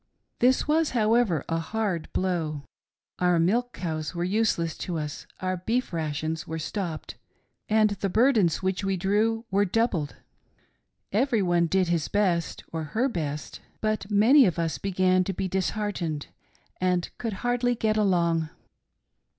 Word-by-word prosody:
This 255 +4 +3
was, 315 +1 +3
however, 215 - +2
a 165 0 0
hard 185 -2 -2
blow. 165 -6 -1 0.6
Our 180 -1 +3
milch 210 +9 +2
cows 160 -4 -4
were 170 - -1
useless 180 -5 0
to 175 -2 -3
us, 150 -2 -5
our 185 0 -1
beef 230 +5 -1
rations 160 0 -3
were 160 - -4
stopped, 165 0 -4 0.5
and 215 -1 +4
the 195 -1 -2
burdens 215 - +3
which 190 +1 -1
we 195 -1 0
drew 215 +5 +1
were 200 +1 +3
doubled. 195 -7 0 1.0
Every 230 +1 +2
otie 175 -2 +2
did 185 -1 +2
his 170 -3 0 0.6
or 160 -1 -2
her 250 +5 +2
best, 150 - -4 0.2
but 215 -2 -1
many 230 +6 +6
of 175 - -1
us 165 -2 -1
began 185 -1 +2
to 195 - -3
be 190 - -2
disheartehedy 185 -5 -2 0.5
and 180 -1 +1
could 230 -3 -2
hardly 245 0 +1
get 220 -1 0
along. 170 -6 +2
185 Hz, 140 wpm, -26 LUFS, 165-220 Hz, 1.0 s, many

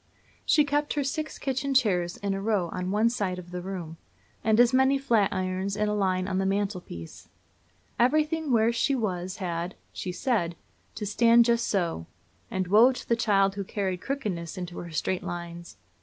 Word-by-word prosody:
She 300 - +5
kept 290 +1 0
her 290 - +1
six 310 +3 -3
kitchen 275 0 -2
chairs 180 -8 +2
in 200 -1 -2
a 195 - -3
row 200 -5 0
on 180 +1 -4
one 210 +3 +3
side 200 -6 -1
of 180 -1 -10
the 180 0 -4
room, 175 -4 -6 0.5
and 220 0 +3
as 245 +1 +5
many 265 +1 +4
flatirons 195 -6 0
in 210 0 +1
a 210 - 0
line 185 -2 0
on 190 -1 -1
the 195 - 0
mantelpiece. 195 - -4 0.7
Everything 305 +4 +2
where 230 0 +3
she 270 +4 +1
was 185 -5 -2
had, 175 -1 -3 0.2
she 185 - -4
said, 175 -4 0 0.4
to 215 - -4
"stand 230 +3 +5
just 235 0 +2
so;" 170 - -1 0.4
and 185 0 -1
woe 215 +7 +6
to 255 - -8
the 235 - +3
child 195 -4 +2
who 200 0 -4
carried 190 -2 -3
crookedness 190 - -4
into 180 -1 -6
her 175 - -7
straight 175 +3 -1
lines! 170 - -7
200 Hz, 180 wpm, -27 LUFS, 180-235 Hz, 0.7 s, woe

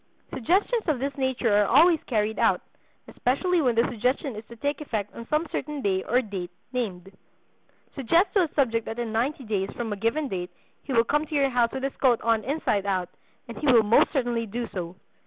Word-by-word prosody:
Suggestions 385 - +1
of 305 -4 +2
this 275 +2 -3
nature 260 -5 +1
are 205 -1 +3
always 325 +5 +5
carried 220 -2 0
out, - - +3 0.5
especially 340 +8 0
when 250 -5 +2
the 230 +1 +3
suggestion 250 +3 -1
is 215 - -7
to 235 - -11
take 285 +5 -2
effect 215 -8 -4
on 230 0 -9
some 305 +2 +1
certain 295 -3 -4
day 190 -2 +1
or 250 +6 +1
date 190 -5 -5 0.2
named. 195 -6 -4 0.8
Suggest 330 - +2
to 400 - +4
a 310 - -11
subject 230 -5 +1
that 225 - -5
in 235 -2 -3
ninety 260 +5 -1
days 200 -4 -2
from 230 -3 -3
a - - -3
given 230 +9 -1
date 180 -6 -4 0.4
he - - -6
will 230 -3 +4
come 295 +5 0
to 305 - -5
your 275 -2 +2
house 240 -1 +2
with 265 - -5
his 275 - -2
coat 250 -4 +3
on 225 -2 +1
inside 230 -7 -1
out, 185 -3 -1 0.4
and 235 - -8
he 300 - -2
will 230 -3 +6
most 210 +2 +4
certainly 240 -5 -1
do 235 +3 -4
so." 175 -1 -5
240 Hz, 210 wpm, -26 LUFS, 215-280 Hz, 0.8 s, will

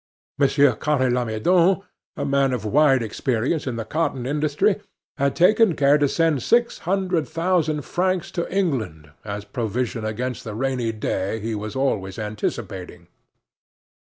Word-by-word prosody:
Monsieur 140 -1 +4
Carre 130 +1 +1
Lamadon, 165 - +2 0.3
a - - -2
man 140 -1 +2
of 115 -4 -3
wide 135 +2 +4
experience 125 +7 -1
in 125 - -2
the 115 -1 -4
cotton 145 -5 -1
industry, 150 +8 +1 0.4
had 140 -1 +1
taken 215 0 +4
care 145 +1 +4
to 145 -1 +2
send 160 -4 +1
six 235 0 +2
hundred 185 -4 0
thousand 165 -3 0
francs 180 +6 -1
to 170 -2 -3
England 110 - -2
as 105 -1 -5
provision 115 +2 -3
against 120 +4 -3
the 105 -2 -6
rainy 125 -1 -1
day 105 -1 -2
he 110 +2 -3
was 105 0 -5
always 105 -8 -1
anticipating. 105 -1 -5
135 Hz, 140 wpm, -23 LUFS, 110-165 Hz, 0.4 s, Monsieur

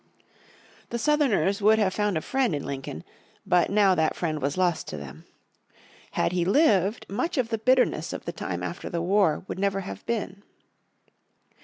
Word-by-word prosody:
The 235 - -2
Southerners 235 -7 +2
would 215 +2 +5
have 200 -4 +1
found 210 -4 0
a - - -2
friend 260 - 0
in 145 - -4
Lincoln, 135 - -6 0.4
but 175 -1 +3
now 200 -2 +4
that 160 -3 +1
friend 155 -3 -2
was 140 +4 -1
lost 180 -3 +1
to - - -5
them. 75 +2 -10 0.9
Had - - +1
he 180 -1 0
lived 205 - +2
much 320 - -2
of 245 -3 +1
the 225 -2 -2
bitterness 255 +3 +2
of - - -7
the - - -4
time - - -4
after - - -5
the 170 - -2
war 185 -4 +2
would - - -5
never 195 0 0
have 195 - -8
been. 200 -4 -3
195 Hz, 175 wpm, -26 LUFS, 170-220 Hz, 0.9 s, would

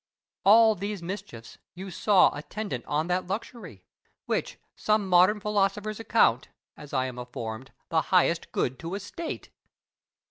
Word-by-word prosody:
All 220 +2 +7
these 200 -1 -5
mischiefs 180 - -8 0.2
you 190 +1 -7
saw 200 0 +4
attendant 150 - -5
on 150 +2 0
that 180 +1 -1
luxury, 190 - -6 0.4
which - - -2 0.2
some 215 -2 +1
modern 185 +4 +5
philosophers 210 +1 -1
account 180 - +2 0.3
(as 145 - -12
I 130 -2 0
am 125 -1 -6
informed) 120 0 -7 0.2
the 160 -1 +2
highest 175 -2 +2
good 125 +1 -1
to 170 +3 -5
a - - -3
state! 315 - -7
185 Hz, 140 wpm, -27 LUFS, 145-210 Hz, 0.4 s, All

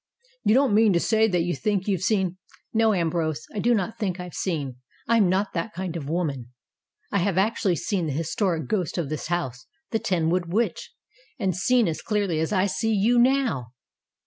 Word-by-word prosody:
"You 215 - +4
don't 270 -4 +4
mean 215 -1 +5
to 170 - +3
say 220 +4 +3
that 180 -5 +1
you 175 -1 -1
think 195 +6 -1
you've 190 -5 0
seen 185 -3 +1 0.2
" - - -38
"No, 225 0 +4
Ambrose, 165 -4 -1
I 210 - -3
do 240 +3 +3
not 220 +3 -2
think 190 -4 -2
I've 180 -1 -7
seen. 145 -9 -3 0.3
I 230 +1 +4
am 200 -5 +4
not 195 +2 0
that 185 +5 -3
kind 185 -2 -4
of 145 -4 -5
woman. 150 -8 -2 0.6
I 200 - +2
have 185 0 0
actually 200 -2 +2
seen 180 -1 -1
the 145 - -2
his 165 +3 -3
toric 175 -6 0
ghost 190 -7 -1
of 165 -5 -2
this 155 0 -4
house 130 -8 -3 0.2
the 225 - +1
Ten 165 -5 0
wood 175 -1 -1
Witch 225 +5 -1 0.5
and 190 -7 0
seen 240 +5 +3
as 160 - -3
clearly 200 -7 0
as 160 +3 -1
I 190 -2 +2
see 225 +3 -1
you 230 +5 +3
now." 240 - +2
185 Hz, 210 wpm, -25 LUFS, 165-215 Hz, 0.6 s, mean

